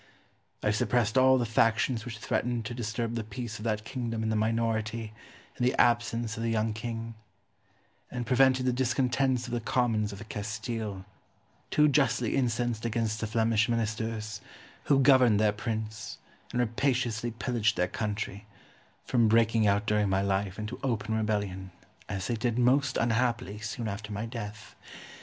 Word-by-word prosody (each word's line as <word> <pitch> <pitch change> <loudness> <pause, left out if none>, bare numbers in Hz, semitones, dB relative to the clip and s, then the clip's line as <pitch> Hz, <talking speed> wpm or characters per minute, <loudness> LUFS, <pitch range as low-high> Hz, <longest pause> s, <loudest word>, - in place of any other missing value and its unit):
I 105 - +3
suppressed 110 +1 +1
all 130 0 +6
the 120 - +1
factions 115 +1 +2
which 115 -3 -6
threatened 120 +1 -1
to 120 - -4
disturb 115 0 -3
the 115 -1 -2
peace 110 0 -6
of 105 - -7
that 105 -2 -1
kingdom 115 -2 -3
in 110 - 0
the 110 - 0
minority 110 0 -1 0.4
and 125 - -3
the 125 - +1
absence 120 -1 +2
of - - -4
the 115 - 0
young 110 -1 0
king; 115 +1 -5 1.0
and 125 -1 -4
prevented 130 +1 +4
the 125 - +2
discontents 125 0 +1
of 120 - -6
the 120 - +1
commons 110 -3 +1
of 105 +2 -9
Castile, 105 -2 -4 0.6
too 150 0 +4
justly 130 -5 +2
incensed 120 -3 0
against 115 -1 -1
the 110 - -1
Flemish 115 +1 +2
Ministers, 110 -2 -2 0.4
who 140 - +4
governed 130 -6 +6
their 105 -1 +3
prince 110 0 -4 0.3
and 125 - -1
rapaciously 120 -1 0
pillaged 115 -1 0
their 90 - +2
country, 105 0 -4 0.6
from 120 -3 +3
breaking 115 0 +4
out 100 +1 +2
during 105 -2 +2
my 95 0 +2
life 95 -1 -1
into 105 +3 -5
open 110 -4 -1
rebellion, 100 -4 -1 0.4
as 95 -3 -3
they 120 - -1
did, 115 +1 -1
most 130 +2 +3
unhappily, 115 -3 0
soon 110 +2 -4
after 105 +1 -5
my 105 +2 -3
death. 110 -4 -7
115 Hz, 160 wpm, -29 LUFS, 105-120 Hz, 1.0 s, all